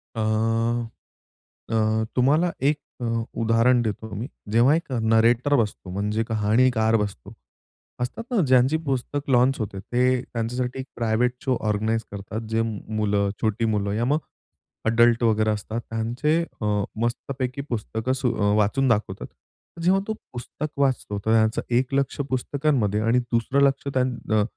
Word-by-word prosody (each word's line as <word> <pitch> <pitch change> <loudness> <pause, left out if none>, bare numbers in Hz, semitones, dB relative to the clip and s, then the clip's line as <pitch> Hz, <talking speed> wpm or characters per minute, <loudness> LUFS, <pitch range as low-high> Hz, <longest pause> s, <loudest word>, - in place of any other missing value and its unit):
अ, - - -4 1.5
अ, 110 0 +1
तुम्हाला 150 +7 +3
एक 145 +2 +2 0.2
अ, - - -2 0.4
उदाहरण 115 +2 +3
देतो 110 -1 -3
मी. 110 +5 -4 0.2
जेव्हा 120 +7 +5
एक 165 -4 -4
नरेटर 115 +3 +3
बसतो 105 -6 -1
म्हणजे 105 +3 -1
कहाणीकार 110 +1 +2
बसतो 100 - -4 0.7
असतात 125 - -3
ना 245 - +1
ज्यांची 130 +4 +4
पुस्तक 140 +1 -2
लॉन्च 130 +2 +3
होते 100 -3 -4
ते 125 +4 +1
त्यांच्यासाठी 125 +2 -3
एक 130 - -4
प्रायव्हेट 115 +1 +1
शो 130 -2 +2
ऑर्गनाइज 110 +2 0
करतात 100 +2 -5
जे 110 0 +1 0.4
मुलं 100 -1 +1
छोटी 110 +1 0
मुलं 105 -2 0
या 115 +3 0
मग 145 +4 +2 0.7
एडल्ट 115 +1 +4
वगैरे 110 -1 +3
असतात 110 +2 -3
त्यांचे 120 +7 0 0.3
अ, - - -1 0.4
मस्तपैकी 130 +2 -3
पुस्तकं 110 +1 -2
अ, 105 -4 +2
वाचून 110 +6 +2
दाखवतात. 105 -5 0 0.6
जेव्हा 190 +3 +3
तो 220 - -1 0.2
पुस्तक 130 +5 -5
वाचतो 130 -7 0
तर 110 - +2
त्यांचं 110 0 +3 0.2
एक 130 +2 0
लक्ष 140 +1 0
पुस्तकांमध्ये 130 -5 0
आणि 115 +3 +3
दुसरं 120 +3 0
लक्ष 135 +1 -2
त्यान 130 -1 0 0.2
अ, 105 -1 +4
115 Hz, 140 wpm, -24 LUFS, 110-130 Hz, 1.5 s, जेव्हा